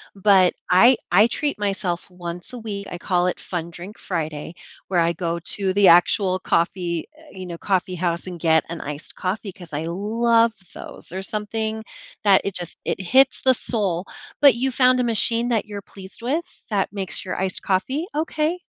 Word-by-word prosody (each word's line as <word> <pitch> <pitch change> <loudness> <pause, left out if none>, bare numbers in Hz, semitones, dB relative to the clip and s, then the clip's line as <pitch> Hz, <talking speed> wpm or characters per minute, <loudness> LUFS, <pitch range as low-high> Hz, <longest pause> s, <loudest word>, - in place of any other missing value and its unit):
But 195 -2 +5 0.2
I 235 +8 +6 0.2
I 210 +5 +7
treat 290 +1 -2
myself 195 -4 -2
once 175 +3 -7
a 250 - -7
week, 205 -3 -6
I 175 - -4
call 180 0 +1
it - - -2
fun-drink 175 +4 -6
Friday, 160 -2 -4 0.4
where 180 -2 +2
I 170 +1 +2
go 170 0 -2
to 190 +3 -2
the 200 -1 +5
actual 185 +2 +5
coffee, 170 -1 0
eh 315 -1 -17
you 185 -1 -8
know, 170 -1 -6
coffee 185 -1 0
house 170 +1 -2
and 175 -1 -6
get 160 -1 +3
an 170 0 -6
iced 145 +1 -6
coffee, 190 +1 -3
'cause 175 -5 -13
I 150 +2 -3
love 230 +6 +2 0.2
those, - - -10
there's 190 +2 -6
something 220 +1 -3 0.4
that 195 -2 +6
it 200 - -3
just 175 -2 -5
it - - -2
hits 260 +8 +4
the 260 - +6
soul. 200 -7 -2 0.4
But 280 -4 +7
you 260 +2 0
found 255 0 +4
a 245 - +2
machine 230 +1 +1
that 225 -3 +1
you're 205 -1 -7
pleased 195 +2 -10
with 300 +8 -4
that 200 -3 0
makes 195 -2 -3
your 185 -1 -4
iced 190 -1 -1
coffee? 260 - -1
Okay. 315 +2 -1
195 Hz, 185 wpm, -22 LUFS, 175-230 Hz, 0.4 s, I